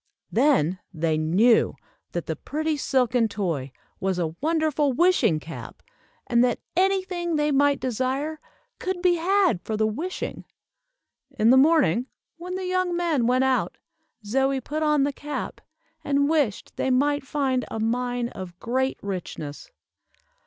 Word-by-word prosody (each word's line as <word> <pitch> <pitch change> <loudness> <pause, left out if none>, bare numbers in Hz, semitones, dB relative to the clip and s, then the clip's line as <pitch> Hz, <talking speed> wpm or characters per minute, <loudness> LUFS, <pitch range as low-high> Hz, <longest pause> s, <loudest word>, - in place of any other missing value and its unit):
Then 225 - +3
they 160 -2 0
knew 185 +10 +3 0.4
that - - -3
the - - -3
pretty 315 +1 -2
silken 250 -4 +1
toy 170 -11 -3 0.3
was 190 -1 -1
a 165 -3 -1
wonderful 310 -3 +1
wishing 345 - +3
cap, 160 +2 -9 0.4
and 240 0 +3
that 245 -2 +1 0.2
any 380 +1 +3
thing 345 -3 -3
they 300 0 +1
might 285 0 +3
desire, 260 +5 -2 0.4
could 370 -1 -2
be 355 -1 +4
had 365 - +2
for 215 +4 -3
the 215 - +2
wishing. 315 - -4 0.9
In 220 +2 +5
the - - +7
morning, 265 - +4 0.3
when 360 +2 -6
the 375 0 -3
young 365 -1 0
men 320 -9 +1
went 255 +1 +3
out, 265 -1 0 0.5
Zoie 270 +5 +1
put 300 +5 -4
on 300 -2 +3
the 285 0 0
cap, 295 +2 -5 0.4
and 280 -1 +2
wished 290 -10 0
they - - 0
might 285 +3 +2
find 265 -2 0
a 225 - -4
mine 245 +1 -1
of 180 -5 -9
great 260 +3 -1
richness. 175 - -6
265 Hz, 145 wpm, -25 LUFS, 220-315 Hz, 0.9 s, the